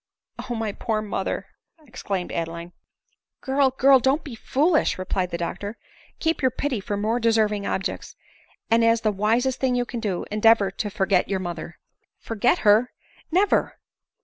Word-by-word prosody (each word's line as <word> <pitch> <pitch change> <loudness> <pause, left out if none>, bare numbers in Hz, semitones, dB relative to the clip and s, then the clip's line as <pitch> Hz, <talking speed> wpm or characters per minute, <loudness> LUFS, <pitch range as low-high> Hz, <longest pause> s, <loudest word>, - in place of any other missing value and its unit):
" - - -12
Oh! 240 - -2
my 220 -2 -2
poor 215 +1 -2
mother 200 -2 -3 0.2
!" 315 -2 -28
exclaimed 195 -6 -4
Adeline. 170 +1 -4 0.4
" - - -51
Girl! 270 0 +2
girl! 265 +1 +5
don't 265 +5 +1
be 280 - -8
foolish," 300 +8 +1
replied 185 0 -2
the 170 - -3
doctor; 200 +5 -5 0.2
" - - -28
keep 325 0 0
your 260 - +3
pity 255 -1 -2
for. 200 +1 -4
more 220 +4 0
deserving 215 -3 +1
objects; 190 - -3 0.6
and, 230 0 +4
as 230 0 +3
the 215 - +1
wisest 230 +6 0
thing 260 -2 +1
you 245 0 0
can 240 0 -5
do, 205 -6 -2
endeavor 210 -2 +4
to 210 +2 -4
forget 190 -2 +1
your 195 -1 0
mo 175 -2 -3
ther." 170 +1 -9 0.4
"Forget 225 -3 +1
her 215 +4 +5
i - - -32
Never." 380 +4 +2
220 Hz, 180 wpm, -24 LUFS, 195-255 Hz, 0.6 s, girl